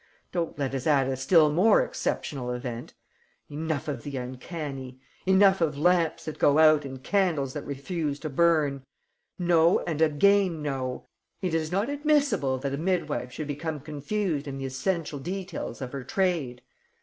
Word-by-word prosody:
Don't 170 -2 -2
let 135 -2 -2
us 135 +2 -2
add 140 -4 +3
a 135 - -1
still 150 +4 +4
more 205 - +5
exceptional 135 - -3
event! 125 -1 -5 0.6
Enough 155 0 -3
of 140 -5 -3
the 140 0 -5
uncanny! 130 0 -6 0.3
Enough 190 0 +5
of 150 -3 +1
lamps 170 +1 +2
that 155 - -6
go 145 +1 +4
out 155 -2 +6
and 130 -1 -8
candles 165 -10 +1
that - - -6
refuse 145 +1 -3
to 155 - -3
burn! 150 -3 +2 0.5
No 170 -1 +4
and 160 -2 -3
again 170 +2 +3
no, 130 -3 -3 0.4
it 180 -3 -1
is 160 0 -1
not 200 +5 +1
admissable 285 - +1
that 140 0 -2
a - - -1
midwife 155 -6 -1
should 155 - -5
become 150 +2 -4
confused 150 +2 -3
in 135 -1 -5
the 135 - -4
essential 150 +2 -2
details 180 -5 -5
of 125 - -6
her 140 -2 -5
trade. 160 -9 -1
150 Hz, 160 wpm, -27 LUFS, 135-175 Hz, 0.6 s, out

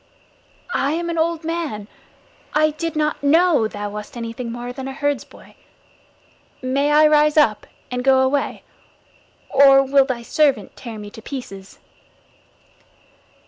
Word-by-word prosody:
"I 280 +2 0
am 340 +1 -2
an 335 - -2
old 330 0 0
man. 320 -11 -4 0.7
I 310 0 +3
did 325 +1 -5
not 305 0 -1
know 305 -4 +3
that - - -17
thou 205 0 -5
wast 210 +3 -8
anything 230 +1 -5
more 240 +1 -6
than 265 0 -6
a 270 - -5
herdsboy. 285 0 -4 1.1
May 275 +3 0
I 305 +1 +6
rise 300 0 +4
up 225 -9 +3 0.2
and 250 0 -3
go 265 0 +4
away, 275 +1 -1 0.9
or 275 -1 +6
will 275 0 +3
thy 250 -3 -4
servant 285 +2 +1
tear 230 -4 -8
me 205 -1 -9
to 225 - -12
pieces?" 200 -8 -9
275 Hz, 140 wpm, -20 LUFS, 240-305 Hz, 1.1 s, I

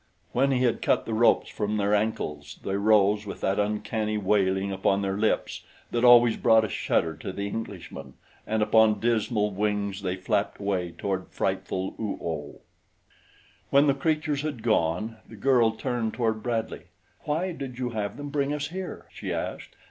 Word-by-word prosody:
When 135 +3 +2
he 130 -2 +2
had 120 -3 +1
cut - - +2
the 115 - -3
ropes 115 +2 +4
from 105 +1 -2
their 100 0 +1
ankles 75 -9 -2
they 95 - -2
rose 105 0 +3
with - - -7
that 95 +1 +1
uncanny 105 +1 -1
wailing 95 -1 +1
upon 95 +1 +1
their 95 0 -1
lips 110 +2 0 0.3
that 120 0 0
always 120 -2 +7
brought 110 -1 +5
a - - -5
shudder 80 -1 0
to 80 - -5
the 100 +2 -4
Englishman, 100 -3 -7 0.3
and 110 0 +1
upon 110 -1 +4
dismal 110 -2 +1
wings 100 0 -1
they 95 -2 -2
flapped 95 - -1
away 95 -3 -1
toward 95 -2 -2
frightful 95 0 -2
Oo 110 -2 -2
oh. 75 -3 -5 1.1
When 140 +1 +5
the 140 - +4
creatures 150 0 0
had 145 -7 -4
gone, 110 +1 0
the 115 - -10
girl 120 +1 +3
turned 115 0 -2
toward 110 -3 0
Bradley. 115 -1 -3 0.4
"Why 165 +5 -1
did 135 -6 -7
you 125 -1 -2
have 105 -3 -3
them 145 0 -6
bring 140 0 0
us 145 -1 -3
here?" 185 +1 -6
she - - -5
asked. - - -5
110 Hz, 170 wpm, -26 LUFS, 100-120 Hz, 1.1 s, always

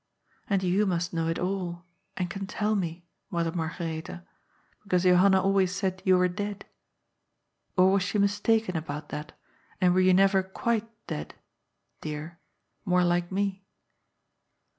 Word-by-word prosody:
And 195 -2 +1
you 190 +3 +2
must 175 -1 -1
know 165 -1 0
it 165 - -1
all, 180 -2 -3 0.3
and 180 - -1
can 195 +2 -5
tell 210 +1 0
me. 170 -3 -3 0.2
Mother 170 -3 -1
Margaretha, 160 - -4 0.6
because 185 -3 0
Johan 180 +2 +6
na 190 - +5
always 190 -1 +2
said 190 -1 -2
you 185 -1 +5
were 180 0 +4
dead. 205 +2 -5 1.1
Or 185 +1 +6
was 195 0 +3
she 195 +3 -1
mistaken 205 0 +2
about 150 -2 -4
that, 150 +1 -6 0.5
and 180 -1 +4
were 185 - +4
you 185 0 +5
never 195 0 +5
quite 225 +3 -2 0.2
dead— 75 0 -5 0.7
dear 155 +2 -6 0.2
— - - -49
more 180 -2 +3
like 175 0 +1
me?" 195 0 -1
185 Hz, 150 wpm, -28 LUFS, 170-195 Hz, 1.1 s, Johan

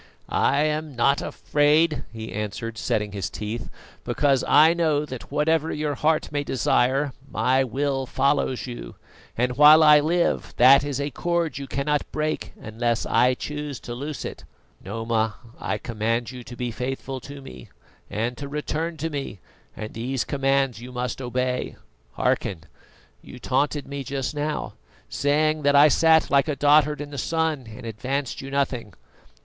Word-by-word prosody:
"I 145 - +3
am 155 -2 -2
not 140 +4 +2
afraid," 150 +2 +2
he 110 -1 -7
answered, 105 +2 -4
setting 105 -4 -1
his 100 -1 -3
teeth, 110 +3 -5 0.3
"because 140 -3 +1
I 160 +2 +6
know 155 -3 +1
that 130 -4 -9
whatever 155 +2 +1
your 150 -1 -2
heart 155 +3 0
may 145 -1 -1
desire, 135 +1 +1 0.2
my 130 +1 +2
will 135 +1 -1
follows 135 -1 0
you, 120 - -8 0.4
and 125 +1 0
while 150 +2 +8
I 150 -1 +8
live 170 +4 0
that 135 +3 +7
is 145 -2 -3
a 140 +1 -2
cord 170 -5 -1
you 140 - -6
cannot 145 +2 -1
break 155 0 -2
unless 115 +1 -2
I 125 +1 +3
choose 150 0 -5
to 120 - -6
loose 145 +4 -5
it, - - -7 0.4
Noma. 110 +1 -1 0.2
I 105 - -2
command 115 +2 -2
you 125 -1 -9
to 120 - -9
be 120 0 -3
faithful 130 +2 -4
to 140 +3 -10
me 135 - -11 0.4
and 115 +4 -2
to 140 - -6
return 155 +3 -3
to 160 +2 -3
me, 140 -7 -5 0.4
and 110 0 -6
these 125 +2 -2
commands 135 -3 0
you 125 +1 -9
must 125 +1 -3
obey. 125 0 -2 0.4
Hearken: 80 +4 -1 0.6
you - - -12
taunted 140 +3 -1
me 140 0 -5
just 135 +1 -3
now, 150 +1 -3 0.4
saying 155 +2 +1
that 145 0 +3
I 145 +2 +8
sat 160 +1 +4
like 140 0 +4
a 150 - -1
dotard 150 +1 +4
in 145 0 -7
the 140 - -5
sun 160 -3 -1
and 110 - -10
advanced 130 +4 -3
you 135 - -7
nothing. 130 -8 -2
135 Hz, 160 wpm, -24 LUFS, 120-150 Hz, 0.6 s, while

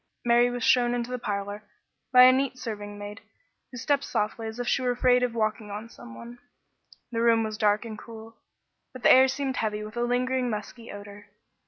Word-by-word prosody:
Mary 240 +1 +4
was 245 -1 -4
shown 245 -1 +3
into 240 0 -3
the 250 - -3
parlor 205 -1 -4 0.5
by 250 -1 +8
a 255 - +9
neat 260 0 0
serving 205 -4 -6
maid, 205 +1 -8 0.5
who 250 - -10
stepped 280 +3 0
softly 220 0 -2
as 220 +2 -7
if 245 - -3
she - - +1
were 250 - 0
afraid 250 0 +3
of 245 -2 -1
waking 215 -1 -1 0.2
some 115 - -12
one. 240 - -11 0.7
The 230 -1 -1
room 230 -1 +4
was 215 -1 -4
dark 210 +1 +1
and 215 -2 -7
cool, 225 0 -11 0.6
but 255 - -11
the - - +7
air 260 +1 +7
seemed 265 -1 -3
heavy 210 -1 -2
with 215 +1 -9
a 240 - -2
lingering 250 +1 0
musky 225 +2 -6
odor. 205 0 -11
235 Hz, 200 wpm, -26 LUFS, 210-250 Hz, 0.7 s, a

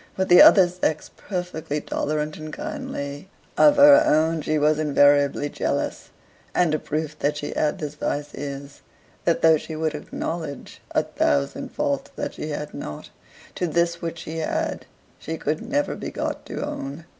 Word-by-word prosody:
With 190 0 0
the 175 - +9
other 190 -3 +8
sex 175 -3 -2
perfectly 180 -6 -4
tolerant 150 +1 -2
and 155 0 -8
kindly, 190 - -6 0.3
of 295 -1 +6
her 290 +1 +8
own 160 - +2
she 155 +1 0
was 150 +1 +2
invariably 145 -1 +3
jealous; - - -3 0.5
and 175 -3 +3
a 155 - +1
proof 155 0 -4
that 150 +1 0
she 145 - -4
had 150 - 0
this 150 -2 -5
vice 145 0 -3
is, 140 0 -7 0.4
that 170 - +1
though 160 -1 +7
she 160 +1 -7
would 155 0 -1
acknowledge 150 -1 -6
a - - +1
thousand 70 -1 -1
faults - - -1
that - - -4
she 155 - -6
had 150 0 -5
not, 75 - -7 0.4
to 180 - -2
this 170 +1 0
which 165 0 -4
she 160 0 -6
had 160 - -2 0.3
she 160 +1 -5
could 155 +1 -2
never 285 +5 -1
be - - -5
got - - -4
to - - -4
own. 140 +4 -6
155 Hz, 165 wpm, -24 LUFS, 145-170 Hz, 0.5 s, the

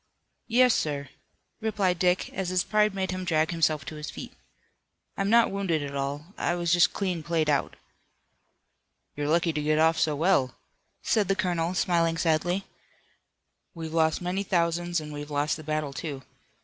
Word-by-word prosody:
"Yes, 250 +1 +5
sir," 145 -3 -2 0.5
replied 200 -6 0
Dick, 180 0 +2
as 190 -1 -2
his 185 -1 +1
pride 210 -1 +2
made 190 -1 -1
him 185 0 -4
drag 160 -2 +1
himself 155 -3 +1
to 155 +2 -7
his 150 +1 -6
feet. - - -8 0.8
"I'm 195 0 -1
not 235 +1 +5
wounded 190 -6 -1
at 140 -1 -6
all. 145 +6 -4
I 175 - 0
was 170 -1 +1
just 175 0 +5
clean 185 -4 -2
played 160 -2 0
out." 145 - 0 1.4
"You're 145 0 -2
lucky 170 +1 +2
to 150 - -2
get 155 +1 +1
off 160 +1 +3
so 160 -2 +2
well," 145 -5 +2 0.5
said 210 -4 +2
the 195 - +2
colonel, 175 -2 -1
smiling 170 -2 +1
sadly. 175 +3 +1 1.1
"We've 160 -1 -6
lost 160 +1 +2
many 180 +2 -1
thousands 175 -2 0
and 150 -1 -8
we've 145 0 -7
lost 145 +1 0
the 155 - -9
battle, 155 -2 -2
too. 140 -2 -5
165 Hz, 170 wpm, -27 LUFS, 155-185 Hz, 1.4 s, Yes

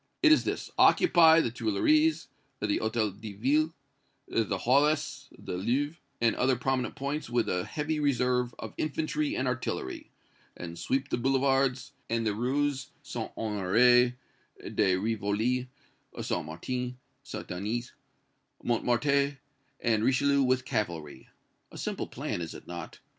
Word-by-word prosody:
It 315 - +7
is 315 - +5
this: - - -3
Occupy 165 - +6
the 120 - -1
Tuileries, 130 - +2 0.3
the - - -1
Hôtel 110 -3 -1
de 110 -2 -6
Ville, 145 +10 +2 0.6
the 110 -3 0
Halles, 145 +4 +1
the - - -6
Louvre 135 - 0 0.2
and 115 -1 +3
other 130 +1 +3
prominent 130 +1 -1
points 140 +2 -3
with 120 -1 +1
a 90 0 -1
heavy 155 +1 -2
reserve 125 -3 +1
of - - -7
infantry 155 0 -1
and 130 - -1
artillery, 125 - -3 0.5
and 85 -1 -7
sweep 135 +1 -1
the - - 0
boulevards, 135 0 +1 0.2
and 115 0 0
the 105 - +1
Rues 135 +4 0 0.2
St. 125 -6 -5
Honoré, 115 +4 +3 0.6
de 95 -3 +3
Rivoli, 110 +5 0 0.5
St. - - -2
Martin, 125 +10 -4 0.2
St. - - -7
Denis, 110 +7 -3 0.7
Montmartre 140 +4 +1 0.4
and 110 -2 +2
Richelieu 140 +3 +3
with 130 -1 +2
cavalry. 85 - -3 0.4
A - - -10
simple - - -3
plan, - - -4
is 80 - -6
it - - -11
not? 85 -2 -7
125 Hz, 135 wpm, -29 LUFS, 110-140 Hz, 0.7 s, It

